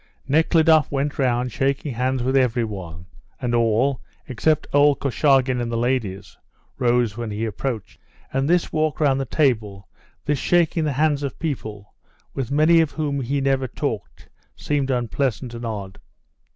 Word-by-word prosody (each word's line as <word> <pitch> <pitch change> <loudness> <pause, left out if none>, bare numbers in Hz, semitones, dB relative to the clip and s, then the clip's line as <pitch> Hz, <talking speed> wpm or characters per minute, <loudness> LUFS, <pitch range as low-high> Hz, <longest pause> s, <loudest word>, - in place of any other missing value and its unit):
Nekhludoff 160 +1 +4
went 140 +1 -2
round 125 -1 +1
shaking 135 +2 -1
hands 130 +1 -1
with 130 +2 0
every 125 -3 +2
one, 90 -6 -7 0.3
and 125 -2 -2
all, 120 +2 +2 0.3
except 145 +4 +1
old 145 0 +4
Korchagin 135 -1 +2
and 120 -1 -3
the 115 - -1
ladies, 115 -6 -2 0.4
rose 120 -4 +1
when 120 -2 -4
he 105 +2 -3
approached. 110 0 -5 0.3
And 135 +2 0
this 175 0 +1
walk 155 -1 0
round 140 -3 +2
the - - -2
table, 110 - 0 0.4
this 145 -2 0
shaking 170 -2 +2
the 150 - 0
hands 150 +1 +1
of 140 -2 -4
people, 110 -10 -5 0.4
with 130 -4 -3
many 155 +4 +4
of 160 - 0
whom 145 -3 -2
he 135 +3 -1
never 135 -1 +1
talked, 115 - -5 0.3
seemed 145 -2 -1
unpleasant 125 0 -1
and 115 0 -5
odd. 100 -4 -6
130 Hz, 155 wpm, -22 LUFS, 115-145 Hz, 0.4 s, Nekhludoff